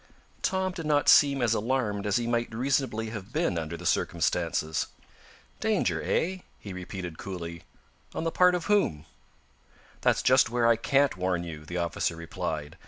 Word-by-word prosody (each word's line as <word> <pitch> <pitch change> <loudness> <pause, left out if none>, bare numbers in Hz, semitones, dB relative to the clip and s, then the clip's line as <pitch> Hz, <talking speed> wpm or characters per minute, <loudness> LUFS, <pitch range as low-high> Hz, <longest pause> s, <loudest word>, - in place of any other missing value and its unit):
Tom 190 0 0
did 165 -4 -6
not 145 -1 +2
seem 140 -3 +6
as 115 -1 +3
alarmed 110 -3 -1
as 100 - +1
he 120 - -1
might 120 0 0
reasonably 120 -3 0
have 105 -1 -7
been 155 - 0
under 85 0 -3
the - - -10
circumstances. 85 -2 0 0.7
"Danger, - - +1
eh?" 185 +2 0 0.2
he 100 - -8
repeated 90 -2 -7
coolly. 85 -3 -6 0.5
"On - - -2
the 165 - 0
part 180 +1 +5
of 175 - -3
whom?" 195 - +1 1.0
"That's - - +2
just 130 -2 +5
where 120 0 +1
I 115 0 +6
can't 135 0 +2
warn 90 -1 0
you," 80 -3 -8
the 85 - -4
officer 85 -1 -1
replied. 80 -3 -5
110 Hz, 165 wpm, -28 LUFS, 85-135 Hz, 1.0 s, seem